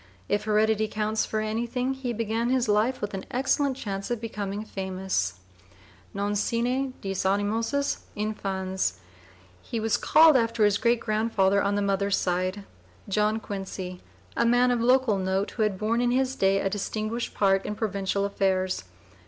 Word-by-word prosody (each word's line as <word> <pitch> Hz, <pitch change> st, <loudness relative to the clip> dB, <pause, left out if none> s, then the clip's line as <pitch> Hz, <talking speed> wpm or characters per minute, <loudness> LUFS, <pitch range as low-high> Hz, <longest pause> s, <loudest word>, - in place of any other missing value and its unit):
If 205 Hz, 0 st, 0 dB
heredity 215 Hz, 0 st, +2 dB
counts 215 Hz, +1 st, -1 dB
for 215 Hz, -, -1 dB
anything 240 Hz, +4 st, -1 dB
he 265 Hz, -2 st, -4 dB
began 230 Hz, +1 st, -1 dB, 0.2 s
life 215 Hz, +5 st, +1 dB
with 205 Hz, 0 st, -3 dB
an 195 Hz, -, -4 dB
excellent 270 Hz, +1 st, +1 dB
chance 195 Hz, -5 st, -4 dB
of 240 Hz, -2 st, -1 dB
becoming 210 Hz, -2 st, -4 dB
famous 190 Hz, -, -2 dB, 0.8 s
non 200 Hz, +1 st, -2 dB
sine 250 Hz, +5 st, 0 dB
dîs 195 Hz, -1 st, -2 dB
animosus 220 Hz, +8 st, 0 dB, 0.2 s
infans. 190 Hz, -3 st, -2 dB, 0.7 s
He 230 Hz, -, -4 dB
was 220 Hz, 0 st, +1 dB
called 315 Hz, -1 st, +6 dB
after 230 Hz, -3 st, +3 dB
his 205 Hz, -1 st, +2 dB
great 235 Hz, -1 st, +2 dB
grandfather 215 Hz, -3 st, +2 dB
on 200 Hz, 0 st, +1 dB
the 205 Hz, -, +1 dB
mother's 200 Hz, 0 st, +1 dB
side, 185 Hz, +2 st, -1 dB, 0.4 s
John 210 Hz, +2 st, +1 dB
Quincy, 190 Hz, -3 st, -6 dB, 0.3 s
a -, -, +2 dB
man 245 Hz, +1 st, +4 dB
of 240 Hz, -2 st, +1 dB
local 250 Hz, -4 st, +3 dB
note 190 Hz, +1 st, -1 dB
who 230 Hz, -, -4 dB
had 210 Hz, -3 st, +1 dB
borne 225 Hz, +4 st, 0 dB
in 245 Hz, -, +2 dB
his 260 Hz, +1 st, +1 dB
day 195 Hz, -2 st, +3 dB
a 195 Hz, -, 0 dB
distinguished 215 Hz, +4 st, -3 dB
part 195 Hz, -1 st, +3 dB
in 210 Hz, -, -4 dB
provincial 200 Hz, -2 st, -1 dB
affairs. 190 Hz, -, 0 dB
210 Hz, 155 wpm, -26 LUFS, 195-235 Hz, 0.8 s, called